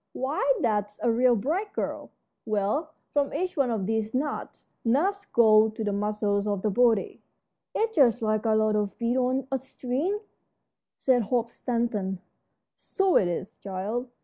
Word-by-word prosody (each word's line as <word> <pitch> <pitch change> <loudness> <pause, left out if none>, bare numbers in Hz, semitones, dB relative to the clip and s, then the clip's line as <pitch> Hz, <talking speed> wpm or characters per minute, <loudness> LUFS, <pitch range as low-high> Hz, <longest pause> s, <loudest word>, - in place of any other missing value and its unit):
Why, 265 +4 -2 0.2
that's 210 -3 0
a 235 - +3
real 245 +1 +4
bright 340 - -2
girl. - - -4 0.3
Well, 220 +9 -1 0.2
from 285 -1 +1
each 360 +4 -2
one 275 -4 +2
of 220 -5 -1
these 220 +2 -1
knots 290 +3 -3 0.2
nerves 370 +12 +1
go 220 -1 +5
to 220 +1 -5
the 205 -1 -1
muscles 210 0 0
of 200 -2 -1
the 215 - +1
body." 230 -1 +2 0.5
"It's 445 0 0
just 245 - +4
like 215 0 0
a 220 - +3
lot 215 0 +2
of 205 -1 -1
beads 240 +2 0
on 255 +1 0
a 270 - 0
string," 270 - -2 0.8
said 255 -2 +3
Hope 235 +1 -1
Stanton. 230 -7 -2 0.6
"So 390 -2 0
it 185 - +5
is, 175 +2 -4
child. 205 +6 -4
235 Hz, 160 wpm, -27 LUFS, 210-265 Hz, 0.8 s, go